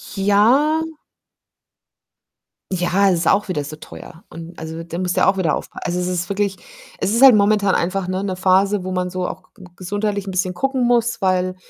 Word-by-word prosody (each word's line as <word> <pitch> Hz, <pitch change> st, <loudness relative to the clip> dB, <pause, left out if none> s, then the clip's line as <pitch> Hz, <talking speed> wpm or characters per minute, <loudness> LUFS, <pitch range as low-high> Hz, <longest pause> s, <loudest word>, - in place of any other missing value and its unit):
Ja? 230 Hz, +11 st, +3 dB, 1.9 s
Ja, 185 Hz, +2 st, +2 dB
es 175 Hz, -, +1 dB
ist 165 Hz, -, -1 dB
auch 205 Hz, +1 st, +2 dB
wieder 150 Hz, -6 st, -2 dB
so 150 Hz, +2 st, -8 dB
teuer 165 Hz, +2 st, -13 dB
und, 165 Hz, +1 st, -10 dB
also, 160 Hz, +1 st, -7 dB
da 170 Hz, 0 st, -7 dB
musst 180 Hz, 0 st, -2 dB
du -, -, +4 dB
auch 195 Hz, 0 st, +2 dB
wieder 170 Hz, -5 st, +1 dB
aufpa -, -, -8 dB
also, 180 Hz, +1 st, -2 dB
es 180 Hz, -, -2 dB
ist 180 Hz, -1 st, -3 dB
wirklich 200 Hz, -1 st, -1 dB, 0.4 s
es 200 Hz, +3 st, 0 dB
ist 235 Hz, -, +1 dB
halt 265 Hz, -4 st, +9 dB
momentan 205 Hz, -1 st, +2 dB
einfach, 185 Hz, +2 st, -1 dB
ne, 185 Hz, +1 st, -2 dB
'ne 190 Hz, -2 st, -3 dB
Phase, 190 Hz, +2 st, +2 dB
wo 185 Hz, -, -5 dB
man 180 Hz, -1 st, -2 dB
so 185 Hz, -1 st, -3 dB
auch 185 Hz, +1 st, -10 dB
ge 195 Hz, -5 st, -15 dB
gesundheitlich 205 Hz, +2 st, -3 dB
'n -, -, -3 dB
bisschen 185 Hz, -1 st, -1 dB
gucken 270 Hz, +3 st, -1 dB
muss, 235 Hz, -1 st, +1 dB
weil, 185 Hz, -1 st, 0 dB
190 Hz, 200 wpm, -20 LUFS, 180-205 Hz, 1.9 s, halt